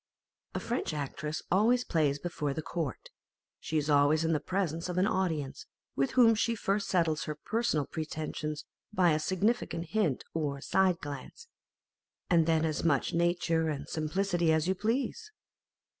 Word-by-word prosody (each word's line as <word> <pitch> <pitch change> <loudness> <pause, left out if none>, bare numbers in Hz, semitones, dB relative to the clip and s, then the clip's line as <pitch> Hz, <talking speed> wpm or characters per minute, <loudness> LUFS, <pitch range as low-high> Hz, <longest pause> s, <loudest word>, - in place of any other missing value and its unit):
A - - 0
French 235 -9 -2
actress 150 +2 -4
always 230 +7 +4
plays 150 - +1
before 145 -3 -3
the 160 - -3
court; 155 -8 -4 0.5
she 160 - -2
is 150 -1 0
always 150 +2 +4
in 165 - +2
the 150 - +1
presence 175 -1 -2
of 180 - -3
an 185 - +4
audience, 165 -9 -1 0.3
with 135 0 0
whom 240 -3 +6
she 230 +1 +1
first 200 -1 -1
settles 165 -4 +1
her 150 - -4
personal 205 -3 0
pretensions 155 -1 -4 0.3
by 185 -5 +4
a 155 - +2
significant 185 -2 0
hint 180 -9 0
or 145 -3 -2
side 185 +4 +2
glance, 145 - -8 0.8
and 165 -2 +4
then 160 -1 +3
as 155 0 -1
much 150 -5 +2
nature 170 -1 +1
and 145 -1 -4
simplicity 170 +1 0
as 160 +1 +2
you 190 - +3
please. 255 - -2
165 Hz, 160 wpm, -30 LUFS, 150-190 Hz, 0.8 s, whom